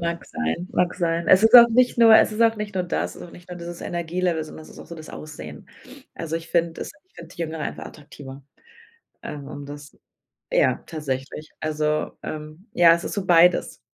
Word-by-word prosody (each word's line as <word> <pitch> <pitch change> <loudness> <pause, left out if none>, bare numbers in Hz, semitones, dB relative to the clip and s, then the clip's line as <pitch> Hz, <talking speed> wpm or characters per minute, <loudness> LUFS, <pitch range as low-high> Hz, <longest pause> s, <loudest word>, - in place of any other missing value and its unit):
Mag 170 0 -3
sein, 80 - -3
mag 180 0 +1
sein. 170 -1 -1
Es 185 +3 +6
ist 225 - +4
auch 235 -1 +11
nicht 245 +1 +2
nur 225 -1 +8
es - - +4
ist 215 - -5
auch 225 -1 +4
nicht 210 -1 -6
nur 180 -1 -1
das, 175 - -2
sondern 175 - -11
nicht 175 0 -15
nur 180 - -7
dieses 170 0 -8
Energielevel, 170 -1 -2
sondern 155 0 -10
es - - -15
ist - - -14
auch - - -11
so 170 - -9
das 155 -1 -11
Aussehen. 75 - -10 0.5
Also 165 0 -4
ich 165 0 -9
finde 170 -1 0
es - - -5
ich 370 - -41
finde 170 +1 -13
Jüngere 160 -1 -4
einfach - - -5
attraktiver. 140 -2 -12 0.8
Ähm, 145 -2 -7
um 145 +1 -8
das 145 0 -11 0.6
ja, - - +2
tatsächlich. 150 -1 -5
Also, 155 0 -1
ähm 155 +7 -8
ja, 170 -1 +6
es 170 - -5
ist - - -4
so 200 -2 -3
beides. 175 0 +4
170 Hz, 205 wpm, -23 LUFS, 155-180 Hz, 0.8 s, auch